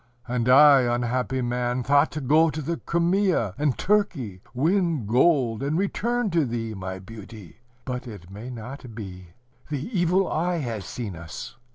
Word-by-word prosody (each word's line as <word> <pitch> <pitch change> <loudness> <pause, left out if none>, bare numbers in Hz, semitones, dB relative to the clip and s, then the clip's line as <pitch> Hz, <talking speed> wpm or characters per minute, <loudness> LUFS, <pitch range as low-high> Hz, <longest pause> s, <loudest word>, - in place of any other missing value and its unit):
"And 125 0 0
I, 140 +1 +8
unhappy 125 +1 0
man, 125 +1 -1
thought 140 +4 +4
to 150 - -4
go 155 +5 +4
to 155 - -4
the 165 +3 -2
Crimea 170 - +1
and 145 -3 +1
Turkey, 170 - 0
win 160 - +1
gold 125 0 +3
and 145 +3 0
return 230 +3 0
to 165 -2 +3
thee, 115 -3 -3
my 95 -1 -5
beauty! 105 -2 -11 0.3
But 125 -1 -4
it 100 -6 -10
may 105 +5 -8
not 125 0 -8
be. 90 -4 -8 0.4
The 145 -1 -3
evil 180 +2 +2
eye 175 +3 0
has 115 - -4
seen 105 +1 -5
us. 80 0 -8
125 Hz, 160 wpm, -25 LUFS, 115-160 Hz, 0.4 s, I